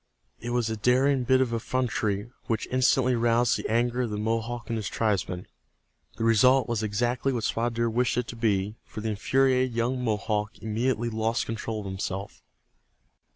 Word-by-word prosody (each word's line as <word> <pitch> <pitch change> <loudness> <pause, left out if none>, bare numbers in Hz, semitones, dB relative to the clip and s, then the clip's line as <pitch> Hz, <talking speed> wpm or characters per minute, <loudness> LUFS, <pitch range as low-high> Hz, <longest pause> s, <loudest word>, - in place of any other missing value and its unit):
It 120 - -6
was 120 -1 0
a 110 - -2
daring 130 +4 +2
bit 130 +1 +4
of 125 -3 0
effrontery 115 -3 -1 0.2
which 110 -3 -1
instantly 130 0 +3
roused 120 0 +3
the - - -4
anger 120 +2 +1
of 120 - -1
the 105 - -3
Mohawk 115 +2 -2
and 115 - -2
his 105 -2 -3
tribesmen. 95 -5 -1 0.7
The - - -2
result 125 +4 +5
was 115 -3 -1
exactly 120 +5 0
what 120 -4 -2
Spotted 115 +2 -1
Deer 115 0 +1
wished 120 +1 +1
it 125 - +1
to - - -6
be, 105 -2 0
for 110 - -8
the 110 - -2
infuriated 130 +3 +2
young 125 +2 0
Mohawk 105 -1 -1
immediately 115 +2 -1
lost 110 +1 0
control 110 -1 -4
of - - -9
himself. 95 +1 -5
115 Hz, 175 wpm, -27 LUFS, 110-125 Hz, 0.7 s, result